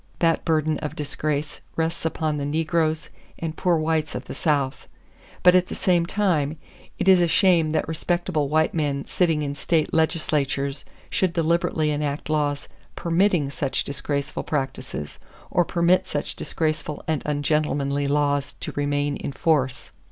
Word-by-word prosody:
That 165 -1 +2
burden 155 -2 +1
of 150 - -5
disgrace 150 0 -2
rests 165 0 -1
upon 155 -2 -1
the 145 - -2
negroes 155 +1 0 0.3
and 165 -1 -4
poor 175 -3 +2
whites 155 -1 0
of 125 +1 -5
the - - -7
South; 140 -4 0 0.6
but 180 0 +8
at 180 0 +4
the - - -5
same 175 -2 +2
time, 165 -7 +1 0.4
it - - -2
is 185 -2 +7
a 175 - +4
shame 170 -2 +4
that - - 0
respectable 160 -2 -1
white 155 +1 +2
men 145 -3 -1
sitting 165 -4 +1
in 140 -1 -2
state 155 +2 0
legislatures 140 -4 0 0.3
should 185 -3 +1
deliberately 165 -2 +1
enact 150 +1 -2
laws 145 -2 0 0.3
permitting 170 -4 +2
such 140 -1 -1
disgraceful 140 0 -3
practices, 135 - -4 0.3
or 175 - +4
permit 180 +2 +2
such 145 -5 -3
disgraceful 155 -2 -2
and 160 -3 0
ungentlemanly 145 -1 0
laws 145 -1 +1
to - - -6
remain 145 0 -1
in - - -4
force! 135 -4 0
155 Hz, 150 wpm, -24 LUFS, 145-165 Hz, 0.6 s, but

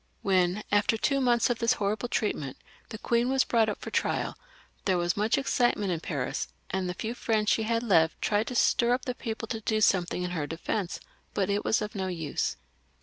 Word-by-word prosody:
When, 185 +1 +2
after 205 +2 +3
two 275 +4 +1
months 240 -2 +3
of 235 - -2
this 230 -1 +3
horrible 210 +4 -1
treatment, 150 - -2 0.3
the 220 - -6
queen 235 +2 +1
was 265 0 +3
brought 225 -2 +2
up 210 - -4
for - - -7
trial, - - 0 0.5
there 185 -2 +2
was 175 0 0
much 210 +3 +2
excitement 240 -7 +1
in 170 - -1
Paris, 140 -6 -3 0.2
and 190 -1 -1
the 180 - -3
few 225 +6 -3
friends 220 -3 +1
she - - +2
had 230 0 +1
left 165 -8 +3
tried 210 +1 +1
to 250 - -4
stir 240 0 +3
up 255 - -7
the 250 - -1
people 225 -1 -5
to 225 -2 -3
do 215 0 0
something 180 -3 +2
in 180 - -3
her 155 -5 -2
defence, 170 +4 -3 0.3
but 200 0 +1
it 205 +1 0
was 215 - +2
of 210 - -5
no 190 -2 -2
use. 160 - -2
210 Hz, 210 wpm, -28 LUFS, 180-230 Hz, 0.5 s, after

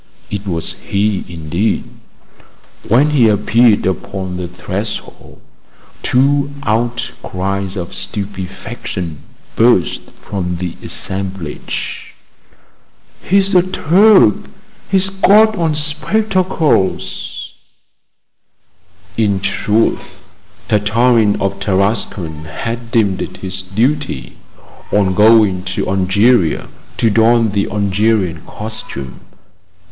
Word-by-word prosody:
It 105 0 -4
was 85 -3 -1
he 100 0 -1
indeed. 85 +5 -1 1.0
When 140 +7 +4
he 130 -6 +4
appeared 110 +2 +3
upon 95 0 -3
the 90 -1 -4
threshold, 95 +4 -6 0.6
two 140 +2 +2
outcries 100 -4 -2
of 90 -1 -5
stupefaction 95 -4 -5 0.4
burst 115 -6 +2
from 90 -3 -4
the 90 -1 -4
assemblage: 95 -5 -4 1.1
"He's 195 +1 +2
a 180 - +6
Turk!" 185 - +4 0.5
"He's 195 0 +4
got 210 +3 +5
on 165 -5 0
spectacles!" 165 - 0 1.6
In 105 -3 +1
truth, 100 +3 -1 0.4
Tartarin 110 0 +2
of 100 -1 -2
Tarascon 95 -5 -1
had 115 +9 -5
deemed 105 -6 +1
it - - -6
his 95 0 -4
duty, 115 - -2 0.5
on 100 -2 +2
going 105 -2 +5
to - - -2
Algeria, 95 +1 +2 0.3
to 115 -2 +2
don 115 0 +3
the 100 0 -1
Algerian 100 -4 0
costume. 105 -11 -8
105 Hz, 90 wpm, -16 LUFS, 95-120 Hz, 1.6 s, a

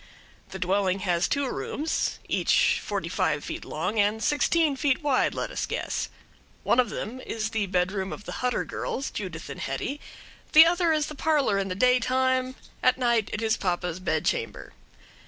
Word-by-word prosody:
The 190 - -6
dwelling 190 +1 0
has 175 -3 +1
two 280 -1 0
rooms 305 +4 -2
each - - +2
forty - - -3
five - - 0
feet - - -5
long 185 +8 -2
and 210 +2 +2
sixteen 300 0 +2
feet 280 +2 0
wide, 280 -3 +2
let - - -3
us - - -3
guess. - - -3 0.5
One 245 - +3
of 245 -3 +3
them 240 +4 -5
is 215 -1 -3
the 220 -3 -1
bedroom 190 +1 -1
of - - -7
the - - -6
Hutter 250 -1 0
girls, 275 - -4
Judith 180 -6 -6
and 140 - -7
Hetty; 200 - -3 0.5
the 315 +1 +10
other 345 0 +2
is 305 -2 +2
the 305 - -7
parlor 285 -9 +1
in 195 - -1
the 185 - -3
daytime, 255 +2 +2 0.3
at 255 0 +4
night 235 -4 +1
it 215 - -3
is 225 0 +2
papa's 180 -2 -2
bedchamber. 455 - -2
230 Hz, 175 wpm, -26 LUFS, 190-275 Hz, 0.5 s, the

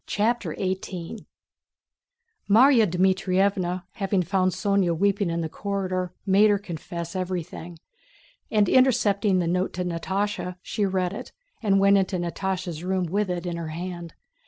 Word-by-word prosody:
CHAPTER 235 +3 0
XVIII 185 +1 -4 1.2
Márya 230 +1 +6
Dmítrievna, 185 0 +1
having 195 -2 0
found 185 +1 +1
Sónya 195 -4 +1
weeping 200 0 +1
in 170 0 -1
the 160 - -2
corridor, 185 -1 -3
made 200 +2 +5
her 205 - +3
confess 170 -1 -7
everything, 175 -2 -4 0.7
and 210 -2 +3
intercepting 210 -6 +3
the 180 - +1
note 180 +2 0
to 180 0 -3
Natásha 185 +2 -2
she 205 -3 -1
read 185 -1 -1
it - - -8 0.3
and 195 -3 +3
went 200 0 +5
into 185 -1 -1
Natásha's 175 -1 -3
room 185 0 0
with 200 +4 -1
it 175 0 -3
in 175 -1 -3
her 165 -1 -4
hand. 170 +1 -6
185 Hz, 140 wpm, -25 LUFS, 175-200 Hz, 1.2 s, Márya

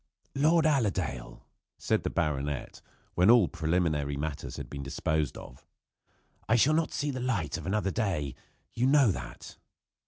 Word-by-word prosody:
"Lord 160 +4 +3
Allerdale," 95 - -1 0.3
said - - 0
the - - -2
baronet, 75 -4 -2 0.3
when 90 +4 +4
all 115 -6 +7
preliminary 80 -4 0
matters 75 -1 -5
had - - -6
been 70 - -7
disposed 75 +1 -1
of. 60 - -12 0.8
"I 115 - +5
shall 135 +6 +4
not 160 0 +1
see 145 0 -2
the 130 - -5
light 115 -12 -1
of - - -6
another 100 -1 0
day. 85 - -1 0.4
You 125 +2 +1
know 135 -5 +5
that." 65 -7 -8
90 Hz, 150 wpm, -29 LUFS, 75-125 Hz, 0.8 s, all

